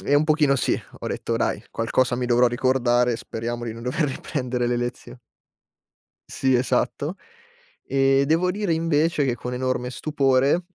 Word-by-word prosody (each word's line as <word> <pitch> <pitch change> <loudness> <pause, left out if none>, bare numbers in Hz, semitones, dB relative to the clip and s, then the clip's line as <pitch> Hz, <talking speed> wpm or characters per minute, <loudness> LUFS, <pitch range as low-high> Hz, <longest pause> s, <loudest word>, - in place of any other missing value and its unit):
eh, 145 - +2
un 145 - +4
pochino 150 -3 +3
sì. 125 - 0 0.2
Ho - - -5
detto: - - -2
"Dai, - - -1
qualcosa 120 +2 0
mi 125 0 -2
dovrò 120 +1 +4
ricordare, 125 -1 +2
speriamo 120 +2 -5
di 115 - -4
non 115 - -9
dover 125 +6 0
riprendere 125 -2 -3
le 120 0 0
lezio" 120 +1 -5 1.1
Sì, 130 -1 +1
esatto. 130 +6 0 0.7
E, 135 0 +3
devo 165 +5 +2
dire 200 -3 -1
invece, 160 -1 +1
che 125 -3 0
con 125 +1 -6
enorme 125 -1 -2
stupore 140 +3 +1
130 Hz, 155 wpm, -23 LUFS, 120-145 Hz, 1.1 s, un